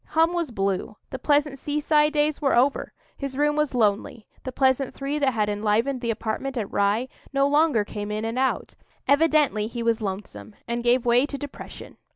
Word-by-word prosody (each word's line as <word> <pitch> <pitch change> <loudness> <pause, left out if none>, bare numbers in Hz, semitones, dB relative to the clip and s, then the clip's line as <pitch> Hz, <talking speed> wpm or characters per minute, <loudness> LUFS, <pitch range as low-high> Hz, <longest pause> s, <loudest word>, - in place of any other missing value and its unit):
Hum 325 +2 +4
was 340 -4 -1
blue; 195 -1 -2 0.2
the 260 - -5
pleasant 290 -2 +1
seaside 300 +1 +2
days 300 0 +1
were 275 -2 +2
over; 265 +4 +2 0.3
his 275 -2 -5
room 295 +1 +2
was 300 -3 0
lonely, 215 0 0 0.2
the 260 - -5
pleasant 265 0 +1
three 280 +2 -3
that 270 -3 +2
had 210 -2 +1
enlivened 215 +5 0
the 235 - -2
apartment 230 +4 -3
at 210 -4 -3
Rye 205 +5 +1 0.2
no 275 0 +2
longer 290 -7 +3
came 205 0 -6
in 215 +1 -2
and 230 +3 -2
out; 265 0 -1 0.3
evidently 285 -7 +3
he 235 +1 -5
was 230 0 +1
lonesome, 190 - -6
and 235 0 -2
gave 245 +1 +3
way 245 +3 +4
to 280 - -5
depression. 285 -1 -9
260 Hz, 190 wpm, -24 LUFS, 220-290 Hz, 0.3 s, Hum